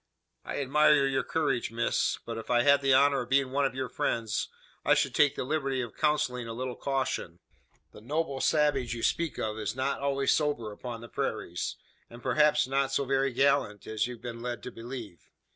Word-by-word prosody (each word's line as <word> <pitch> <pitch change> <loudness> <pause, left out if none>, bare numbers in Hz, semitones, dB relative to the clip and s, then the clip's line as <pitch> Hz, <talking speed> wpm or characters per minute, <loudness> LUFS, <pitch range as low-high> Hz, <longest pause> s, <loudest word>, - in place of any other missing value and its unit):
"I - - -4
admire 145 +1 +4
your 135 -1 +1
courage, 135 -6 -1
miss; 115 +1 0
but 115 -1 -4
if 115 - -10
I 120 -1 +4
had 140 +1 +5
the 135 -1 +2
honour 140 0 +4
of 120 - -7
being 135 -1 +2
one 140 +1 +2
of 135 - -1
your 130 -1 -2
friends, 115 -2 -1 0.3
I - - +4
should - - +1
take 145 -2 +4
the - - -2
liberty 135 -1 -1
of 120 -3 -6
counselling 150 -6 0
a 115 - -5
little 125 0 -4
caution. 135 -11 -2 0.5
The - - -13
`noble 140 +2 -2
savage' 145 -6 +2
you 115 - -6
speak 170 -3 0
of, 110 0 -3
is 110 +1 -3
not 135 +2 -1
always 140 -1 +2
sober 145 -8 0
upon 115 +2 -7
the 120 - -9
prairies; 90 -5 -3 0.3
and 120 +1 -12
perhaps 150 +4 +3
not 135 +1 0
so 140 +1 0
very 135 0 +1
gallant 120 -5 +1
as 110 +1 -1
you've 120 -2 -9
been 115 -1 -6
led 120 0 -4
to 125 - -6
believe. 115 - -9
130 Hz, 200 wpm, -29 LUFS, 115-140 Hz, 0.5 s, had